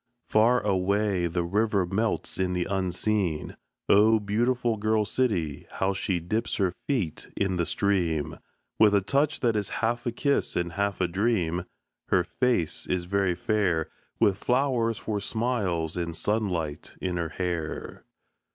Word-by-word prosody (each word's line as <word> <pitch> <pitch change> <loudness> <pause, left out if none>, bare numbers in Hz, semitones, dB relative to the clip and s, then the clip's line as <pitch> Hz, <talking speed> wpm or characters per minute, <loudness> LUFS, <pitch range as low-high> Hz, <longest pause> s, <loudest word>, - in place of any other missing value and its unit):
Far 115 +4 +4
away 100 -1 +1
The 85 +1 -1
river 100 +1 +1
melts 105 +4 -1
in 90 -1 +1
the 90 -1 0
unseen. 95 -2 -1 0.3
Oh, 110 +2 +5
beautiful 115 +3 0
Girl 110 0 +1
City, 95 - -1
how 95 +1 0
she 95 -1 -1
dips 110 +8 -1
Her 95 -4 +1
feet 115 - -2
in 95 -2 0
the 85 - 0
stream 80 -6 0 0.4
With 105 -2 +6
a 100 - +4
touch 140 +9 +1
that 115 -3 +2
is 105 -3 -1 0.2
half 120 +2 -1
a - - +1
kiss 140 +4 0
and 85 -1 -1
half 100 +2 -1
a 90 - +3
dream! 90 -3 0 0.4
Her - - +3
face 120 -11 0
is 90 -1 -1
very 95 -1 +1
fair, 90 -5 0 0.3
With 100 -1 +3
flowers 125 -3 +1
for 105 -2 -3
smiles 100 -8 -1
and 85 -2 -3
sunlight 90 -8 -1
in 90 -1 -2
her 85 -2 -2
hair. 85 -2 -4
100 Hz, 150 wpm, -27 LUFS, 90-110 Hz, 0.4 s, With